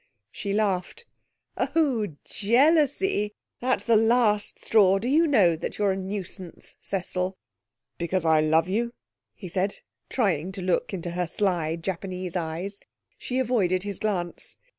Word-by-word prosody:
She 200 - -4
laughed. 205 - -1 0.5
'Oh, 270 -10 +1 0.2
jealousy! 275 - +2 0.2
That's 255 +1 0
the 230 - +3
last 220 -2 +2
straw. 195 -3 +5
Do 215 +5 -3
you 315 +5 +4
know 200 - +4
that 160 - -5
you're 205 -2 +2
a - - 0
nuisance, 190 -2 -6
Cecil?' 185 0 -2 0.6
'Because 170 +1 -1
I 160 -1 +5
love 160 +2 +3
you?' 235 +5 -1 0.4
he 190 - -8
said, 190 +3 -1 0.3
trying 190 - 0
to 195 - -5
look 180 -1 0
into 175 -3 -4
her 180 0 -1
sly 175 -4 0
Japanese 185 +1 -4
eyes. 175 +4 -3 0.4
She 250 - -3
avoided 205 -8 +1
his 200 -2 -4
glance. 180 -5 -2
195 Hz, 140 wpm, -26 LUFS, 180-225 Hz, 0.6 s, straw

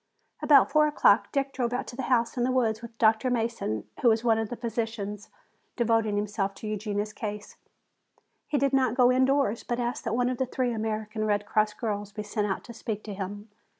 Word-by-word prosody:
About 280 -3 +6
four 305 0 +5
o'clock 230 -8 +3
Dick 275 -1 -1
drove 245 -2 -1
out 250 - -2
to - - -9
the 265 - -3
house 235 -2 +2
in 245 - 0
the 255 - +1
woods 230 -4 +1
with 235 -1 -10
Dr. 220 +3 +3
Mason, 225 - -2
who 240 - +5
was 225 0 +2
one 225 -2 +3
of 220 -2 -2
the 245 - -4
physicians 225 -3 -4 0.5
devoting 225 -3 +1
himself 205 -1 -2
to 215 - -8
Eugenia's 210 0 -3
case. 210 -1 -6 0.9
He 295 - 0
did 275 0 +1
not 260 -2 +2
go 250 -1 +5
indoors, 260 -3 +2
but 240 0 -2
asked 240 0 -2
that 220 - 0
one 245 0 +1
of 255 - -3
the 260 - 0
three 250 -1 -1
American 215 0 -3
Red 205 -1 0
Cross 210 0 +1
girls 205 -3 -3
be 210 +1 -5
sent 210 0 -2
out 195 - -3
to 235 - -10
speak 220 -2 -5
to 210 - -6
him. 205 +2 -6
225 Hz, 215 wpm, -27 LUFS, 210-245 Hz, 0.9 s, About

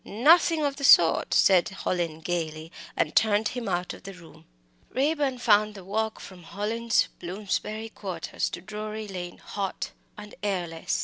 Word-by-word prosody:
"Nothing 315 - +4
of 280 -1 -1
the 280 - -7
sort," - - +6
said 185 -3 +5
Hallin, 170 -4 -3
gaily, 160 -1 -3 0.3
and - - 0
turned 215 -1 +3
him 245 -4 -4
out 175 0 -2
of - - -12
the 195 0 -9
room. 170 -2 -16 0.4
Raeburn 280 -1 0
found 215 -3 +3
the 195 - -10
walk 220 +3 -2
from 185 -2 -11
Hallin's 215 +6 0
Bloomsbury 210 +4 -3
quarters 185 -6 -4
to - - -7
Drury 215 +2 -6
Lane 180 -3 -6
hot 195 -2 -4 0.3
and 210 0 -10
airless. 175 -5 -2
205 Hz, 150 wpm, -27 LUFS, 180-220 Hz, 0.4 s, sort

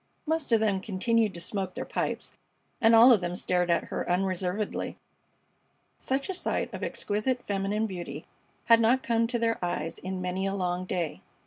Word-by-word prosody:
Most 320 -4 -1
of 225 - +5
them 205 -3 +1
continued 220 +2 +1
to - - -6
smoke 190 +1 -3
their - - -4
pipes, - - -3 0.5
and 225 -1 +6
all 240 +3 +9
of 210 - +2
them 175 0 -2
stared 180 -1 +1
at 170 - +2
her - - -3
unreservedly. 185 +2 -1 1.0
Such 270 +1 -1
a 380 - -2
sight 365 - -2
of - - -6
exquisite 245 +5 -1
feminine 200 +2 -1
beauty 175 -7 -6 0.4
had 230 -1 +7
not 240 +3 +3
come 230 -1 +2
to 240 +1 -1
their 230 -4 0
eyes 165 -2 -3
in 185 0 -4
many 185 +1 -2
a 195 - -2
long 180 -1 -1
day. 175 -4 -3
195 Hz, 180 wpm, -28 LUFS, 180-230 Hz, 1.0 s, all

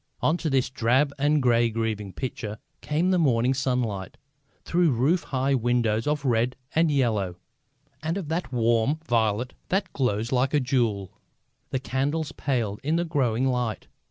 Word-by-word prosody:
Onto 165 0 +1
this 130 -2 +1
drab 130 +4 +2
and 145 0 +2
grey 120 -1 +4
and 115 - -7
grieving 110 -3 -2
picture 110 -2 -5 0.2
came 165 +5 +1
the 185 - +3
morning 125 -4 +3
sunlight, 125 -7 -2 0.5
through 175 -1 +2
roof 140 +8 +2
high 135 +1 0
windows 120 -2 +1
of 150 -1 0
red 120 0 +1 0.2
and 165 0 +3
yellow 110 -10 +1 0.7
and 160 +4 -2
of 185 -6 -4
that 165 -3 -2
warm 120 +3 +2
violet 115 +1 +1 0.2
that 190 -1 0
glows 115 -3 0
like 130 +3 +2
a - - +5
jewel. 115 -7 0 0.6
The 130 - -1
candles 140 +4 -1
paled 115 -7 -2
in 155 +4 0
the 170 +1 +1
growing 130 -7 +1
light. 125 -4 -1
130 Hz, 155 wpm, -26 LUFS, 115-150 Hz, 0.7 s, a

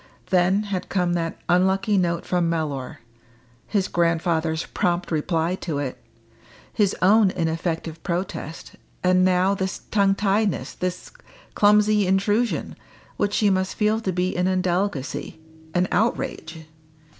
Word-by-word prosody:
Then 185 +3 +3
had 200 -3 -4
come 180 -2 +1
that 165 -1 -2
unlucky 190 +3 +2
note 170 -3 0
from 175 -2 +1
Mellor; 150 -6 -3 0.7
his 195 -3 0
grandfather's 165 -1 0
prompt 175 0 -1
reply 165 +2 0
to 160 -6 -4
it; 140 -3 -4 0.7
his 205 -3 +2
own 205 +1 +5
ineffective 165 -1 -3
protest; 170 -3 -5 0.3
and 185 0 +4
now 185 +1 +3
this 190 -1 -3
tongue 200 -2 +3
tiedness 205 +1 0
this 180 0 -4 0.4
clumsy 210 -1 +4
intrusion 205 +5 0 0.4
which 205 0 0
she 210 -2 +3
must 190 0 0
feel 215 +1 +1
to 190 - -1
be 180 +1 -1
an 180 +1 +1
indelicacy 185 -6 -1 0.4
an 180 +1 +2
outrage. 165 -6 -2
185 Hz, 125 wpm, -23 LUFS, 170-200 Hz, 0.7 s, own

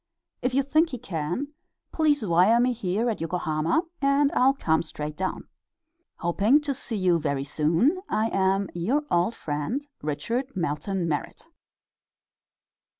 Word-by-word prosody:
If 250 0 -1
you 275 - +3
think 310 +5 +2
he 255 - -5
can, 195 - -3 0.4
please 295 -6 +2
wire 185 +6 +4
me 250 +1 +3
here 210 +1 -1
at 225 -7 -2
Yokohama, 165 - 0 0.2
and 280 +1 +3
I'll 270 +2 +3
come 160 - +1
straight 150 -2 -6
down. 185 +3 -3 0.7
Hoping 200 - +3
to 290 -1 -1
see 240 -3 -3
you 180 -4 +2
very 140 -3 -1
soon, 165 - +1
I 220 +1 +1
am 195 0 +1
Your 230 - 0
old 175 +7 +2
friend, 155 - -3
RICHARD 230 - -3
MELTON 170 +2 -2
MERRIT. 150 -3 -4
195 Hz, 140 wpm, -26 LUFS, 165-260 Hz, 0.7 s, wire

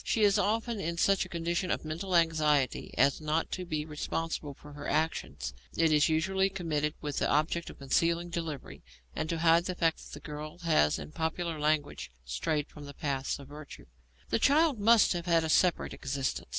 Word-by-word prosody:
She 220 - +1
is 200 -1 +4
often 225 +1 0
in 170 -1 -3
such 195 +2 +3
a - - -12
condition 170 +2 -2
of - - -1
mental 175 +4 -3
anxiety 155 -5 +2
as 135 +4 +3
not 155 +1 -1
to 185 - -4
be 155 -2 -2
responsible 150 -1 -4
for 145 +1 -13
her 145 0 -7
actions. 70 - -1 0.2
It 165 -1 +3
is 150 0 +4
usually 190 +5 +2
committed 155 -5 -2
with 145 -2 -3
the - - +1
object 160 +3 +1
of - - -11
concealing 170 +5 0
delivery, 165 -5 -5 0.3
and 155 - -2
to 170 - -1
hide 165 +1 +4
the 185 - -3
fact 165 -2 +1
that - - -12
the - - -7
girl 150 +1 -7
has, 115 - +3
in - - -8
popular 160 0 -2
language, 150 -1 0 0.2
'strayed 140 - -1
from 150 -1 -11
the 140 -1 -10
paths 140 -3 -2
of 140 -1 -12
virtue.' 150 0 -11 0.5
The - - +2
child 285 0 +4
must 225 0 +5
have 175 0 -4
had 165 -1 +3
a 160 - -2
separate 180 +2 +2
existence. 135 -1 -3
160 Hz, 195 wpm, -30 LUFS, 150-175 Hz, 0.5 s, must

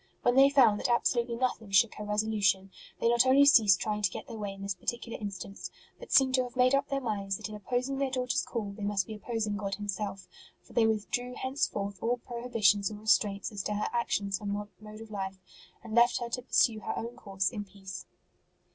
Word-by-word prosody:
When 245 - +4
they 270 +1 +7
found 245 -7 +5
that - - -1
absolutely 235 0 +1
nothing 230 -3 -2
shook 200 +3 +4
her 210 - -7
resolution, 210 -2 +1 0.3
they - - +1
not 235 +1 +5
only 275 +2 +6
ceased 215 -9 +6
trying 210 -1 -2
to 200 - +2
get - - -7
their 230 -3 -8
way 205 -1 -3
in 195 0 -10
this 200 0 -1
particular 235 +4 -5
instance, 200 -1 -6 0.3
but - - -11
seem 265 -1 +5
to 260 0 +3
have 245 0 -9
made 255 +1 +4
up 275 0 +2
their 275 - 0
minds 200 -6 -2
that 215 - -6
in - - -8
opposing 250 +6 -2
their 275 -1 0
daughter 255 -1 -1
s - - +2
call 215 -4 -4
they 205 +2 -11
must 200 -2 0
be 220 - -7
opposing 215 -1 -3
God 200 -1 -3
Himself; 200 -1 -4 0.4
for - - -18
they 225 -1 +4
withdrew 245 +3 -2
hence 265 +3 -1
forth 200 -1 -5
all 240 +2 +1
prohibitions 230 -5 +1
or 215 - -7
restraints 210 0 +1
as 205 -2 -4
to 210 - -3
her 210 - -1
actions 200 -4 -1
and 205 -1 -3 0.3
mode 215 0 -11
of 225 -1 -11
life, 195 -2 -4 0.5
and 225 -2 -8
left 235 +1 +5
her 240 -1 -4
to 250 +1 -3
pursue 225 -2 +2
her - - -4
own 235 +1 -5
course 195 -2 -2
in 210 -4 -4
peace. 195 -2 -10
215 Hz, 225 wpm, -30 LUFS, 200-245 Hz, 0.5 s, they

